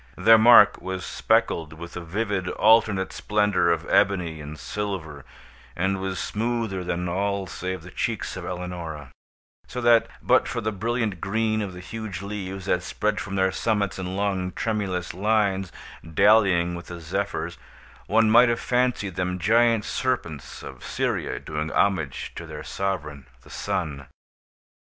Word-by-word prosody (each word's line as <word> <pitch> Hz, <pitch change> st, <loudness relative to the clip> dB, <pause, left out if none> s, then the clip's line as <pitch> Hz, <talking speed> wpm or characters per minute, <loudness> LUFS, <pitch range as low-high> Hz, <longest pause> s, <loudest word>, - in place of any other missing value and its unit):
Their 110 Hz, +4 st, +7 dB
mark 115 Hz, -2 st, +7 dB
was 95 Hz, 0 st, -4 dB
speckled 80 Hz, -1 st, +1 dB
with 85 Hz, +2 st, -9 dB
the 90 Hz, -, -5 dB
vivid 95 Hz, +1 st, -2 dB
alternate 110 Hz, -3 st, +3 dB
splendor 105 Hz, -5 st, +2 dB
of 85 Hz, -, -1 dB
ebony 85 Hz, -6 st, +2 dB
and 75 Hz, +1 st, -8 dB
silver, 80 Hz, -1 st, -5 dB, 0.5 s
and 95 Hz, +2 st, 0 dB
was 95 Hz, -1 st, -3 dB
smoother 110 Hz, -3 st, -2 dB
than 90 Hz, 0 st, -2 dB
all 100 Hz, +2 st, -1 dB
save 95 Hz, +1 st, -5 dB
the -, -, -11 dB
cheeks -, -, -2 dB
of -, -, -6 dB
Eleonora; 85 Hz, -6 st, -6 dB, 0.6 s
so 125 Hz, -, -5 dB
that, 120 Hz, -1 st, +5 dB
but -, -, +3 dB
for -, -, -3 dB
the 110 Hz, -1 st, -1 dB
brilliant 110 Hz, -2 st, -2 dB
green 110 Hz, +1 st, 0 dB
of 100 Hz, -3 st, -4 dB
the 90 Hz, -, -9 dB
huge 100 Hz, -1 st, -6 dB
leaves 95 Hz, -2 st, -5 dB
that 90 Hz, -2 st, +1 dB
spread 105 Hz, +3 st, -1 dB
from 100 Hz, -, -5 dB
their 95 Hz, 0 st, +2 dB
summits 100 Hz, -2 st, -1 dB
in 90 Hz, 0 st, -4 dB
long, 95 Hz, -2 st, -1 dB
tremulous 100 Hz, -6 st, -2 dB
lines, 100 Hz, -1 st, +1 dB, 0.4 s
dallying 95 Hz, -4 st, +4 dB
with 85 Hz, 0 st, -7 dB
the 85 Hz, -1 st, -7 dB
Zephyrs, 85 Hz, 0 st, -3 dB, 0.5 s
one 110 Hz, +1 st, +4 dB
might 120 Hz, +3 st, +6 dB
have 115 Hz, -, 0 dB
fancied 125 Hz, -6 st, 0 dB
them 90 Hz, 0 st, -1 dB
giant 115 Hz, +3 st, +3 dB
serpents 80 Hz, -4 st, -3 dB
of -, -, -10 dB
Syria -, -, -2 dB
doing 75 Hz, 0 st, -4 dB
homage 80 Hz, -8 st, 0 dB
to -, -, -7 dB
their -, -, -7 dB
sovereign 75 Hz, -9 st, -4 dB, 0.2 s
the -, -, -16 dB
Sun. 70 Hz, -3 st, -3 dB
95 Hz, 150 wpm, -25 LUFS, 85-105 Hz, 0.6 s, Their